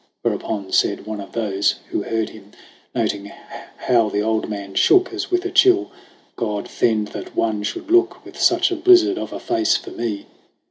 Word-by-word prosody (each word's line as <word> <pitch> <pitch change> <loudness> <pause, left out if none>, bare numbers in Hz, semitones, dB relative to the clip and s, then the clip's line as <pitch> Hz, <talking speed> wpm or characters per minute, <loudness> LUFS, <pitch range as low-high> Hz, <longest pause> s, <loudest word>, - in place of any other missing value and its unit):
Whereupon 100 -3 -2
said - - +1
one 110 -1 -5
of 100 - -11
those 100 -3 0 0.2
Who - - -1
heard 115 -1 -2
him, 105 -1 -15 0.4
noting 100 -1 -1 0.5
how 115 -4 +2
the 105 0 -1
old 110 0 -1
man 100 -2 -6
shook 370 - +4
As 375 +1 -4
with 360 0 0
a 370 - -2
chill: 380 -1 +4 0.4
"God 105 -3 -3
fend 110 -3 0
that - - -8
one 110 -2 0
should 330 - -5
look 360 +1 +2
With - - -12
such 350 +1 +3
a - - 0
blizzard 365 +2 +5
of - - -5
a - - -6
face 340 -1 +1
for - - -10
me 110 -4 -4
115 Hz, 185 wpm, -21 LUFS, -, 0.5 s, blizzard